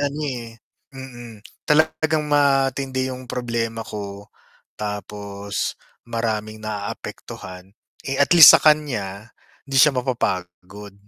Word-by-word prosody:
ano, 145 +1 -2
eh 120 -4 -6 0.4
mm, 120 -5 -10 0.3
talagang 155 0 +2
matindi 135 -2 +1
yung 130 0 -7
problema 115 -2 -3
ko 100 -2 -8 0.5
tapos 100 -1 -5 0.3
maraming 110 -2 -3
naaapektuhan. 100 -3 -7 0.3
Eh, 135 +1 -2
at 140 - +3
least 160 - +12
sa - - +6
kanya, 115 -9 0 0.3
hindi 135 -1 -4
siya 150 -2 +5
mapapagod. 100 -5 -4
115 Hz, 105 wpm, -22 LUFS, 105-135 Hz, 0.5 s, least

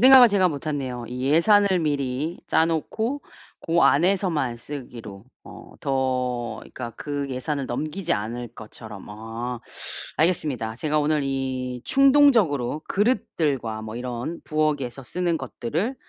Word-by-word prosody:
생각을 260 0 +10
제가 195 -4 +3
못했네요. 140 -5 -3
이 125 +2 -4
예산을 195 +4 +5
미리 145 +1 -1
짜 160 - +4
놓고 220 - -2 0.4
고 170 +1 +3
안에서만 165 -6 +2
쓰기로 115 -6 -8 0.2
어 - - -11 0.2
더 125 -3 -1
그러니까 120 -2 -7
그 145 -1 -3
예산을 135 +2 -2
넘기지 155 +8 -2
않을 115 +3 -3
것처럼. 110 -2 -9
아. 115 +3 -5 0.6
알겠습니다. 150 -9 +1
제가 155 +2 0
오늘 150 0 +2
이 130 -2 -2
충동적으로 235 - +4
그릇들과 150 - 0
뭐 110 0 -6
이런 125 +6 -4
부엌에서 145 -5 -1
쓰는 175 +2 -1
것들을 155 - -2
140 Hz, 285 characters per minute, -24 LUFS, 125-170 Hz, 0.6 s, 생각을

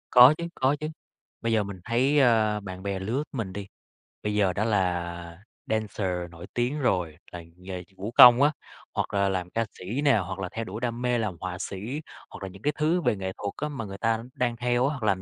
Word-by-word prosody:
Có 125 +3 +10
chứ, 170 - -4
có 130 +2 +2
chứ, 155 - -3 0.5
bây 115 - 0
giờ 110 -2 +3
mình 100 -2 -7
thấy, 130 +6 +3
ơ, 110 -5 +4
bạn 95 -2 -8
bè 100 -1 -2
lứa 115 +10 -1
mình 115 -9 -4
đi, 100 0 -6 0.6
bây 105 0 -1
giờ 100 -3 +3
đã 105 - 0
là 85 -3 -1 0.2
dancer 95 -5 -2
nổi 85 +2 -10
tiếng 125 +5 0
rồi 90 - 0
là 85 -1 -7
nghề 90 0 -7
vũ 105 +4 -5
công 125 +1 +9
á, 145 +1 +5 0.4
hoặc - - -2
là 100 -1 +2
làm 90 -2 -2
ca 115 +4 -1
sĩ 110 +10 -3
nè, 140 -5 +5
hoặc 95 -1 -3
là 95 -2 -3
theo 115 +1 -4
đuổi 110 +3 -6
đam 120 -1 -2
mê 125 -1 +1
làm 105 -6 -2
họa 90 -1 -4
sĩ 105 +10 -4 0.3
hoặc - - -10
là 95 - -4
những 95 +1 -13
cái 150 +4 +1
thứ 160 +4 +2
về 130 - +2
nghệ 95 -1 -4
thuật 100 -1 -4
á 150 - -1
mà 135 -6 -5
người 100 -1 -7
ta 115 +2 0
đang 120 -1 0
theo 120 +2 +2
á, - - 0
hoặc 135 -6 -6
làm 95 -3 +2
105 Hz, 235 wpm, -27 LUFS, 95-125 Hz, 0.6 s, Có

